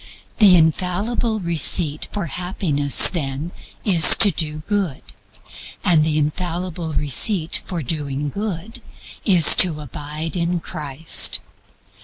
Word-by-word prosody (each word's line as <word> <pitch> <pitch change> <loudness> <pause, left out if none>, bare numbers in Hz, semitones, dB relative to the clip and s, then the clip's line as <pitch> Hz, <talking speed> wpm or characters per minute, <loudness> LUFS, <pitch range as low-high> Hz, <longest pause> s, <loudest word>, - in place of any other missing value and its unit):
The 200 -4 +6
infallible 185 +8 -1
receipt 165 -2 0
for 205 -4 -5
Happiness, 160 -4 +1
then, 150 -1 -5 0.3
is 180 -6 +7
to 205 - +6
do 155 -2 -5
good; 200 -9 -3 0.8
and 170 -4 +3
the 155 -1 -2
infallible 170 +2 -4
receipt 160 - 0
for 175 -4 -5
doing 145 0 -4
good 200 +3 -6 0.4
is 180 -7 +7
to 165 -5 +3
abide 150 +3 -6
in 175 0 -2
Christ. 150 -1 -1
165 Hz, 110 wpm, -19 LUFS, 150-185 Hz, 0.8 s, is